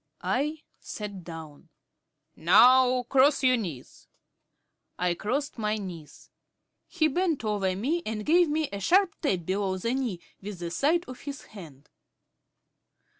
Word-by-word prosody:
I 300 +4 -1 0.2
sat 200 -4 -7
down. 160 -2 -10 0.7
"Now 250 +9 +5
cross 275 +3 +3
your 255 -1 +5
knees." 170 - -7 0.9
I 180 -1 +1
crossed 255 - -3
my 215 0 0
knees. 175 -7 -9 0.6
He 315 -4 +1
bent 320 -4 -1
over 200 -3 0
me 285 - -1
and 215 -1 -4
gave 340 +1 +4
me 310 0 0
a 200 - -3
sharp 360 - +3
tap 185 - -1
below 190 0 -1
the 230 +6 -2
knee 250 -9 -2 0.2
with 200 -1 -7
the 170 -1 -5
side 325 - +1
of 255 0 -9
his 280 -1 -7
hand. 155 -9 -13
220 Hz, 135 wpm, -27 LUFS, 185-285 Hz, 0.9 s, Now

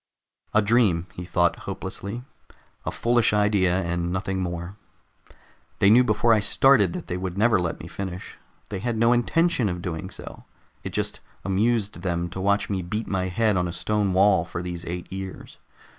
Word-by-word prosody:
A 110 - +5
dream, 100 -6 +3
he 90 - -7
thought 85 0 +2
hopelessly, 110 +5 -5 0.6
_a - - 0
foolish 120 -2 +2
idea 100 -3 +2
and 85 0 -2
nothing 95 +1 -2
more. 85 +1 -4 1.0
They 100 - +5
knew 125 +3 +7
before 115 0 +3
I 110 - +4
started 135 +9 +4
that 180 -2 -5
they 90 - -3
would 90 0 -4
never 110 -1 +4
let 85 -2 -2
me - - -8
finish. 95 -2 -7 0.3
They 100 - -4
had 115 +2 -2
no 115 +2 +4
intention 130 0 +2
of 90 -1 -4
doing 90 0 -4
so, - - -10 0.4
it - - -4
just - - -3 0.3
amused 100 0 0
them 85 -1 -2
to 95 - -5
watch 100 +1 +2
me 95 -2 -2
beat 105 +6 -3
my 95 -1 -1
head 105 +3 +1
on 90 -1 +1
a 85 - -5
stone 105 0 0
wall 95 +1 +4
for 85 - -6
these 90 -1 -6
eight 90 +2 -6
years. 95 -1 -7
95 Hz, 180 wpm, -25 LUFS, 90-110 Hz, 1.0 s, knew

